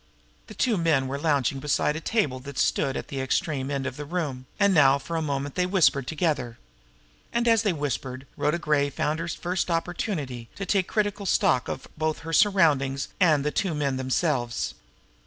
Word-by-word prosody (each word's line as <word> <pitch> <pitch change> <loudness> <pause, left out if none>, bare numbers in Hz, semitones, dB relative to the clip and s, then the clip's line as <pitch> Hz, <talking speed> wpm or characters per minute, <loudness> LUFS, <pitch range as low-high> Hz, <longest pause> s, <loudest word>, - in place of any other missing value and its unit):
The - - -11
two 235 -5 +1
men 155 -6 +2
were 140 +2 -3
lounging 140 -4 +1
beside 150 +1 +1
a - - -3
table 150 - 0
that 140 +1 -9
stood 135 - +1
at - - -6
the 135 -1 -3
extreme 135 0 -1
end 140 -2 -2
of 130 - -4
the 150 - -5
room, 145 -5 -4
and 200 -1 +4
now 140 -4 +6
for 165 +4 -6
a 165 - 0
moment 140 -2 -2
they 180 0 0
whispered 160 -8 +3
together. 150 -8 -1 0.7
And, 235 0 0
as 225 -2 +5
they 210 -3 +1
whispered, 135 -3 -4
Rhoda 150 +3 +1
Gray 150 -4 +1
found 150 +3 -1
her 165 - -3
first 180 +2 -2
opportunity 165 - -3
to 195 - -4
take 190 -1 +1
critical 205 -2 -1
stock 125 -7 +2 0.3
both 155 0 0
of - - -14
her 165 0 -5
surroundings 150 -9 +3
and 160 -6 +4
of - - -4
the 150 - 0
two 180 -2 -1
men 140 -3 -1
themselves. 130 -2 -1
150 Hz, 195 wpm, -26 LUFS, 135-175 Hz, 0.7 s, now